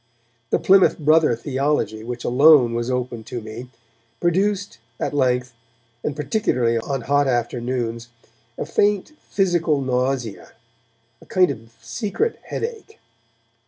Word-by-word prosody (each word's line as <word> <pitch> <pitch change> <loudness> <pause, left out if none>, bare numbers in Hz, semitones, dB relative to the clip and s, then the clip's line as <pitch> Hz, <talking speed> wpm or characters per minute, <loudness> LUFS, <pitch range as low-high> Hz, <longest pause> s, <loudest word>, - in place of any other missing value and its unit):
The - - +2
Plymouth 190 -1 +4
Brother 155 -4 +4
theology 130 -4 -1
which 120 +1 -6
alone 130 -1 +6
was 120 +1 -2
open 125 -2 -3
to 125 - -5
me 115 +3 -9 0.5
produced, 195 - 0 0.2
at - - -2
length, 125 -2 +1 0.5
and 150 - -2
particularly 130 - 0
on 135 +3 -3
hot 145 +3 +2
afternoons, 120 -1 -2 0.5
a - - -3
faint 205 +4 +1 0.2
physical 175 -6 +1
nausea, 125 -3 -2 0.7
a - - -17
kind 180 -5 +3
of 115 -2 -10
secret 210 - -2
headache. 450 -1 -6
130 Hz, 120 wpm, -22 LUFS, 120-165 Hz, 0.7 s, alone